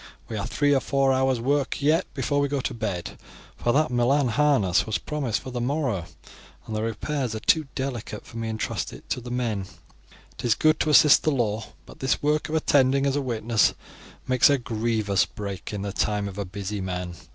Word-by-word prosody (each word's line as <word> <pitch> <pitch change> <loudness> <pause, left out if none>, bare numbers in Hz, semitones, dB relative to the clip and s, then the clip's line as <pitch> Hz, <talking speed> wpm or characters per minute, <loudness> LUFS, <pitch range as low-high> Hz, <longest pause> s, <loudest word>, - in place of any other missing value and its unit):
We 110 - -4
have 100 -2 -3
three 145 +1 +2
or 135 - +4
four 135 0 +2
hours' 130 -1 +2
work 140 +3 0
yet 155 +5 +2
before 145 -1 0
we 140 - +2
go 140 0 -1
to 130 - -3
bed, 100 -7 -4 0.4
for 120 - 0
that 145 0 +2
Milan 125 +2 +2
harness 110 -9 +2
was 110 - 0
promised 140 -7 -2
for 130 - -8
the 120 -1 -3
morrow, 125 - -1 0.6
and 110 - -5
the 110 - -1
repairs 120 +2 -2
are - - -3
too 155 +5 +2
delicate 120 -5 -4
for 115 - -10
me 115 0 -3
to - - -3
entrust 110 -1 -3
it - - -12
to 125 - -1
the 120 - -8
men. 115 -6 -2 0.7
It - - -6
is 115 - +4
good 155 0 +3
to 155 - +1
assist 150 0 +7
the - - +1
law, 115 -6 0 0.2
but - - -14
this 135 - +1
work 150 +1 0
of 160 - -2
attending 140 -3 +3
as 140 0 +1
a 145 - +1
witness 115 -3 +1 0.5
makes 130 +1 +5
a 140 - +4
grievous 110 -4 0
break 100 -4 -6
in 100 -2 -4
the 100 -1 -4
time 105 -1 0
of 100 0 -7
a 100 - -2
busy 100 +2 -5
man. 90 -1 -4
120 Hz, 215 wpm, -25 LUFS, 105-140 Hz, 0.7 s, assist